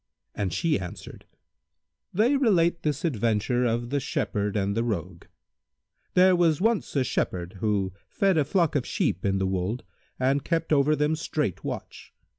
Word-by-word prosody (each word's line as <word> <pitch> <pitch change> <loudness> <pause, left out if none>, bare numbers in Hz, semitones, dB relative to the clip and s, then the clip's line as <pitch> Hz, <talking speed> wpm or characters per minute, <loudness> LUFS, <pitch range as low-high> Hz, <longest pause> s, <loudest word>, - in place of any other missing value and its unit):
and 100 -3 -2
she 165 -4 +1
answered, 90 -2 -9 0.9
"They 230 +9 +3
relate 180 -10 +3
this 150 +3 -1
adventure 120 -2 +1
of 120 +1 -1
The 145 - +1
Shepherd 105 -5 -2
and 100 0 0
the 115 - +1
Rogue.[FN#159] 90 -6 -4 0.9
There 185 0 +6
was 170 -3 +3
once 225 -2 0
a 135 - +3
Shepherd, 90 -6 -2
who 100 -3 0 0.2
fed 195 -2 +2
a 155 - +3
flock 165 +2 +1
of 140 - +2
sheep 90 - -1
in 95 -1 +1
the 95 - 0
wold 95 +5 -2 0.4
and 135 +2 +1
kept 165 -2 0
over 150 +1 +4
them 150 +1 +1
strait 150 - -2
watch. - - -7
130 Hz, 160 wpm, -26 LUFS, 100-165 Hz, 0.9 s, There